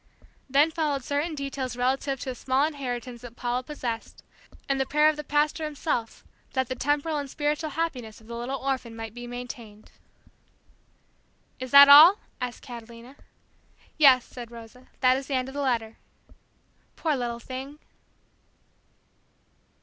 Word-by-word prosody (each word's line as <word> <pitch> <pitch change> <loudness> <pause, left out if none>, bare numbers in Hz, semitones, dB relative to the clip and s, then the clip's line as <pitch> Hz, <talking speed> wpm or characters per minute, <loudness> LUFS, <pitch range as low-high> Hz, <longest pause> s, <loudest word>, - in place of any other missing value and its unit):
Then 285 +4 +4
followed 300 -4 -1
certain 295 +4 -2
details 275 -3 -4
relative 265 +2 0
to 260 - -3
a - - -5
small 260 +3 +1
inheritance 250 -5 -5
that 240 -1 -11
Paula 245 +1 -2
possessed, 250 -4 -6 0.4
and 275 -1 0
the - - +1
prayer 300 +2 +4
of 310 - -1
the 300 - -6
Pastor 295 +2 0
himself 295 -6 -3 0.3
that 260 -2 0
the - - -1
temporal 290 +4 0
and 280 -1 -5
spiritual 300 +3 -1
happiness 265 -9 -4
of 220 - -19
the 235 +1 -8
little 245 +3 -4
orphan 260 -4 -3
might 225 -1 -7
be 240 0 -8
maintained. 240 -3 -9 1.7
"Is 255 0 -5
that 280 +1 +10
all?" 310 +8 +10 0.2
asked 250 -1 -5
Catalina. 235 +1 -11 0.8
"Yes," 270 -5 +6
said 240 -2 -9
Rosa; 235 +2 -13
"that 255 0 +5
is 270 0 -6
the 275 - -1
end 255 0 -1
of - - -10
the 285 - -3
letter." 230 -5 -1 1.0
"Poor 315 -3 0
little 240 -2 -3
thing!" 265 +4 -7
260 Hz, 150 wpm, -26 LUFS, 240-290 Hz, 1.7 s, that